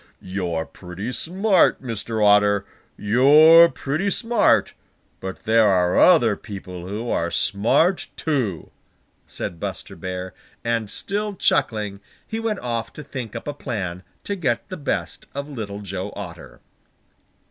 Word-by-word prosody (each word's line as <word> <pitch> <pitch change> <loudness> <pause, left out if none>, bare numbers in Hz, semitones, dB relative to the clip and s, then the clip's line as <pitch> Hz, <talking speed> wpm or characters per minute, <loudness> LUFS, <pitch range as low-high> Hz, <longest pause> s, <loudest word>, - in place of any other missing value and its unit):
"You're 90 -4 -3
pretty 95 +8 -7
smart, 185 - +2
Mr. 115 -2 -2
Otter! 105 -1 +4 0.3
You're 150 +10 +7
pretty 155 +9 -2
smart, 230 +1 +2 0.5
but 95 -1 -7
there 110 0 +4
are 90 -2 +2
other 120 - +5
people 90 -4 -8
who 105 +5 -4
are 85 - 0
smart 130 - +1
too," 125 - -2 0.6
said 85 - -6
Buster - - -6
Bear, 95 0 -5 0.3
and 115 -3 -1
still 205 - -2
chuckling, 105 - 0 0.3
he 220 - -4
went 225 -3 -2
off 115 -2 -3
to 150 - -9
think 130 -5 -7
up 115 - -6
a 145 - -2
plan 100 -11 -4 0.2
to 200 - -3
get 130 -9 -1
the 185 - -5
best 145 - -3
of 140 +1 -4
Little 105 -8 -6
Joe 95 0 -5
Otter. 90 -4 -9
115 Hz, 135 wpm, -22 LUFS, 100-150 Hz, 0.6 s, You're